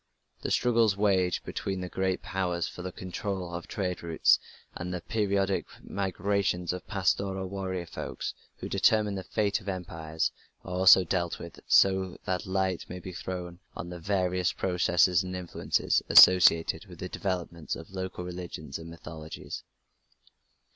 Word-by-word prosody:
The - - -3
struggles 115 -4 +3
waged 95 -3 +2
between 95 -1 -3
the 90 - -4
great 95 0 -1
Powers 90 -3 -1
for - - -8
the 90 +1 -5
control 95 -1 -4
of 85 0 -5
trade 90 -3 -3
routes, 85 -2 +4 0.3
and 90 +1 -5
the 90 - -2
periodic 100 -1 0 0.2
migrations 100 -2 -1
of 90 - -7
pastoral 95 -1 0
warrior 95 -2 -3
folks 70 -6 -5 0.2
who - - -6
determined 105 -2 +3
the 95 - -4
fate 105 +1 0
of 100 - -6
empires, 80 -4 -2 0.3
are 90 - -5
also 95 0 +7
dealt 85 -1 -1
with, 85 -1 -10
so 95 -2 +4
that 90 0 -2
light 95 -1 -1
may 90 - -6
be 90 0 -8
thrown 90 -1 -6 0.2
on 85 - -6
the 90 - -7
various 90 0 0
processes 90 -1 +3
and 95 -1 -5
influences 90 -2 0
associated 85 -3 +7
with - - -12
the - - -5
developments 85 -4 -3
of 80 +3 -10
local 95 -1 -5
religions 85 -5 -6
and 80 0 -9
mythologies. 80 -1 -8
90 Hz, 150 wpm, -29 LUFS, 85-95 Hz, 0.3 s, also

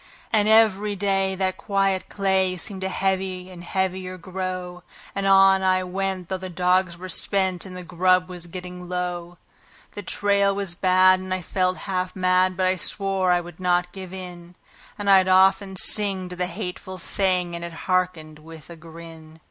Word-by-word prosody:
And 210 -1 +3
every 210 -2 +3
day 195 -1 0
that 185 0 -1
quiet 195 -2 -1
clay 190 -2 0
seemed 190 +3 -4
to 190 - -2
heavy 190 -1 -2
and 175 -1 -11
heavier 185 0 -3
grow; 185 -1 -6 0.3
And 195 0 -2
on 195 0 +5
I 185 0 +2
went, 190 0 -3
though 190 0 -3
the 185 0 -7
dogs 180 0 +1
were 185 +2 -8
spent 190 0 -1
and 185 -1 -9
the 180 - -7
grub 180 +1 +2
was 175 -1 -7
getting 180 0 -9
low; 175 -1 -4 0.5
The 205 - -7
trail 200 0 +1
was 195 -3 -2
bad, 185 +1 +4
and 185 0 -8
I 185 -1 -2
felt 185 +1 -1
half 185 -2 -3
mad, 185 0 +2
but 185 - +1
I 185 0 +1
swore 195 0 -1
I 175 0 +2
would 175 +1 -12
not 180 -1 0
give 185 -1 -9
in; 180 -2 -9 0.4
And 205 -1 -5
I'd 190 -1 +5
often 190 +1 +3
sing 190 -1 +5
to 180 - -7
the 180 0 -2
hateful 185 0 -7
thing, 180 -1 -1
and 170 - -6
it 170 -1 -7
hearkened 180 -4 -1
with 160 +1 -13
a - - -9
grin. 160 -1 -13
185 Hz, 180 wpm, -23 LUFS, 180-190 Hz, 0.5 s, on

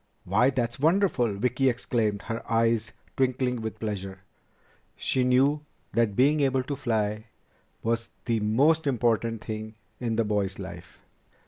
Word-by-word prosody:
"Why, 110 +8 +3
that's 120 -3 -2
wonderful!" 155 - +2
Vicki 125 +5 +2
exclaimed, 110 -4 -1
her 115 0 -4
eyes 115 0 +2 0.2
twinkling 125 -2 0
with 110 0 -5
pleasure. 95 -3 -4 0.7
She 130 - 0
knew 135 +4 +3 0.3
that 115 -4 +2
being 145 +6 +4
able 135 -2 +2
to 140 +2 -3
fly 110 -4 -1 0.6
was 115 0 -1 0.2
the 115 -2 +1
most 145 +10 +3
important 115 -3 +1
thing 110 0 -6 0.2
in 115 -2 -1
the 115 0 +1
boy's 100 -2 -1
life. 85 -3 -9
115 Hz, 135 wpm, -27 LUFS, 110-130 Hz, 0.7 s, being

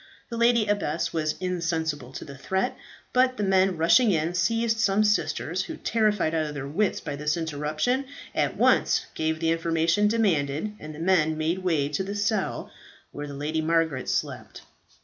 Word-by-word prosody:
The 230 - -3
lady 235 -1 +4
abbess 170 -5 -1
was 155 -2 -1
insensible 165 -7 -2
to - - -7
the 140 - -10
threat; 190 +8 -1 0.4
but 255 0 +3
the 210 - -1
men 190 -2 +3
rushing 190 +9 +5
in, 165 0 0
seized 225 +6 +1
some 210 -1 +3
sisters, 190 -3 0
who, - - -7
terrified 210 -7 +1
out 160 -1 0
of 150 - -7
their 140 -1 -5
wits 190 +8 0
by 145 -3 -5
this 150 +2 -1
irruption, 160 - -1 0.3
at - - 0
once - - +3
gave 160 0 -1
the 165 0 +1
information 165 +4 +2
demanded, 195 -5 0
and 155 0 -8
the - - -10
men 165 -3 +2
made 160 +3 0
their 190 - -8
way 155 -6 +2
to 150 +6 -1
the 200 +2 -5
cell 205 -1 -1 0.4
where 145 0 -6
the 140 - -7
Lady 155 +3 -2
Margaret 160 -4 0
slept. - - -3
165 Hz, 180 wpm, -26 LUFS, 155-205 Hz, 0.4 s, rushing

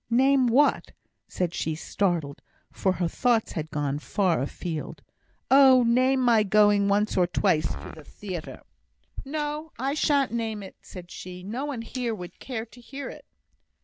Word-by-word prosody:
"Name 260 +2 +4
what?" 265 +5 +2 0.3
said 175 -2 -2
she, 160 -2 -2
startled, 165 -4 -2 0.3
for 190 - 0
her 175 -1 -1
thoughts 235 +4 +1
had 155 -1 -4
gone 145 -1 -2
far 180 -3 0
afield. 155 +3 -5 0.5
"Oh, 265 -2 +7
name 255 +3 +3
my 235 -3 +4
going 205 0 +4
once 205 +1 +1
or 180 -2 +3
twice 155 -2 +1
to - - -8
the 155 - -12
theatre!" 180 +1 -8 0.6
"No, 300 +2 -4
I 270 +3 -1
shan't 285 -4 +2
name 225 -3 -3
it!" 190 - -11
said 180 -2 -11
she. 180 0 -9
"No 235 +8 -4
one 265 -6 -4
here 240 -1 -3
would 180 -3 -10
care 230 -4 -5
to 245 +2 -17
hear 275 +3 -7
it." - - -11
215 Hz, 160 wpm, -26 LUFS, 180-260 Hz, 0.6 s, Oh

